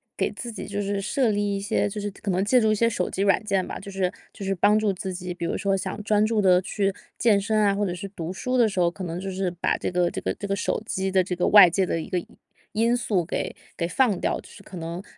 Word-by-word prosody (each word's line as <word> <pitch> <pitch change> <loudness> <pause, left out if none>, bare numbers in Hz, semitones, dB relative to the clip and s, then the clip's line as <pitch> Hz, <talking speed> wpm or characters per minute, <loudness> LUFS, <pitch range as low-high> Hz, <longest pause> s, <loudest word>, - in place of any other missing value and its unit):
给 - - 0
自 240 - -7
己 - - -6
就 205 0 -3
是 200 0 -2
设 235 +3 +1
立 205 0 0
一 - - -3
些， 205 +1 0
就 210 +1 -5
是 205 0 -3
可 200 0 -4
能 185 +2 +1
借 245 +3 +4
助 220 - +3
一 - - +3
些 230 +2 +3
手 195 -6 -2
机 195 - -1
软 200 +2 +3
件 195 -3 0
吧， - - -5
就 200 0 -9
是 190 -2 0 0.2
就 200 - -8
是 195 0 0
帮 210 +4 +4
助 210 -2 +1
自 185 +1 -5
己。 180 0 -5
比 175 -1 -8
如 - - -1
说 195 -1 +1
想 195 +2 -4
专 210 -1 +3
注 215 -1 +1
地 185 -1 +5
去 195 0 -1 0.2
健 215 -4 +4
身 215 +1 +1
啊， 200 -1 +3
或 205 0 0
者 175 - -2
是 180 +3 -6
读 180 -3 -6
书 255 +7 -2
的 235 -3 +4
时 195 - -3
候， 175 - +4
可 185 +2 -8
能 170 0 -4
就 195 +1 -4
是 190 -1 -2
把 175 0 0
这 - - -3
个 180 -1 +2
这 - - -5
个 - - -1
这 200 - -6
个 195 - 0
手 200 - -1
机 190 -1 -2
的 190 - +4
这 180 0 -3
个 180 - 0
外 205 -4 +9
界 185 +2 +1
的 165 - -1
一 - - -6
个 180 - -1
因 175 - -3 0.5
因 230 +3 +2
素 210 -8 0
给 - - -3 0.2
给 170 - -1
放 215 +1 +2
掉， - - 0
就 - - -13
是 200 - -14
可 190 - -10
能 170 +3 -5
195 Hz, 320 characters per minute, -25 LUFS, 180-210 Hz, 0.5 s, 外